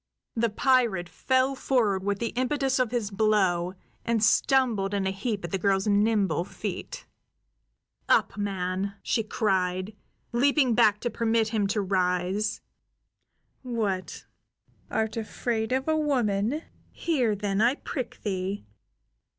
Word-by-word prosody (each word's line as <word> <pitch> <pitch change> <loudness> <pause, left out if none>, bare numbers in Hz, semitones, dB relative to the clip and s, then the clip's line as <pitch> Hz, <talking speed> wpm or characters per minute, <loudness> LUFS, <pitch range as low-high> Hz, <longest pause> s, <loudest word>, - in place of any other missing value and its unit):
The 230 0 +1
pirate 225 -6 +2
fell 260 +7 +1
forward 225 -8 +1
with 200 0 0
the 230 +2 -2
impetus 265 +1 0
of 250 -3 +2
his 225 -3 -2
blow, 190 -4 +1 0.3
and 230 -2 0
stumbled 220 -4 +3
in 195 -1 0
a 190 - +1
heap 200 0 -3
at 170 - -7
the 195 - -1
girl's 195 0 +2
nimble 205 -4 +2
feet. - - -6 1.0
"Up, - - +3
man!" 195 -1 -2
she 225 - +1
cried, 190 -2 -1 0.4
leaping 265 +1 +3
back 215 -3 +4
to 240 - -2
permit 225 -1 +1
him 215 -3 0
to 210 +1 0
rise. 185 +2 0 1.0
"What, 215 -7 -3 0.6
art 220 0 -1
afraid 225 +1 -2
of 265 +2 0
a 315 - +2
woman? 255 -2 0 0.3
Here, 255 -10 0
then, 200 0 -1
I 240 +4 +4
prick 255 -5 -6
thee! 190 - -3
215 Hz, 130 wpm, -27 LUFS, 195-245 Hz, 1.0 s, back